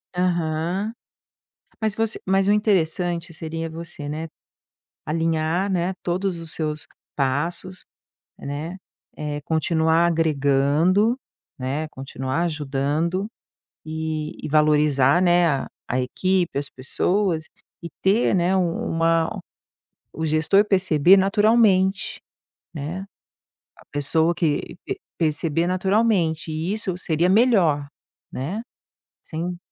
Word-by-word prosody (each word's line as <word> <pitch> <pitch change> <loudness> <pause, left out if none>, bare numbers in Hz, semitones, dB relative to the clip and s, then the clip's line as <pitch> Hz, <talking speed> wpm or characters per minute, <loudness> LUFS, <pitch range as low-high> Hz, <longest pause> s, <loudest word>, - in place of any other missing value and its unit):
Aham. 175 +3 -1 0.9
Mas 220 -2 0
você 225 0 0
mas 195 +1 +2
o - - +5
interessante 175 -4 +1
seria 165 0 -4
você, 160 -2 -7
né, 155 +2 -4 0.8
alinhar, 165 +3 0
né, 180 0 0
todos 180 +1 -1
os 165 -1 -7
seus 155 -1 -3 0.3
passos, 165 +7 -2 0.5
né, 150 +6 -5 0.4
eh, 150 -1 -4
continuar 160 +2 +2
agregando, 160 - +2 0.4
né, 135 +4 -2
continuar 135 +2 -3
ajudando 155 +4 -1 0.6
e 155 -1 -4
e - - -2
valorizar, 150 0 +4
né, 175 -1 +4
a 140 -5 0 0.2
a 125 - 0
equipe, 180 +5 0
as 140 -1 -4
pessoas 170 +6 0 0.4
e 170 - -5
ter, 200 +4 +3
né, 180 +1 +2
um 175 -3 -1
uma 165 0 +2 0.8
o 160 - -4
gestor 160 +6 +3
perceber 185 -3 +4
naturalmente, 195 -1 +3 0.5
né. 165 +5 -5 0.7
A - - -18
pessoa 160 +4 +1
que 155 -4 -1
pe 395 - -3 0.2
perceber 160 +1 0
naturalmente, 185 -3 +1
e, 160 +4 -2
isso, 195 -4 -2
seria 170 0 +1
melhor, 185 - +3 0.5
né, 175 - -4 0.6
sem 175 +2 -5
165 Hz, 105 wpm, -23 LUFS, 155-185 Hz, 0.9 s, o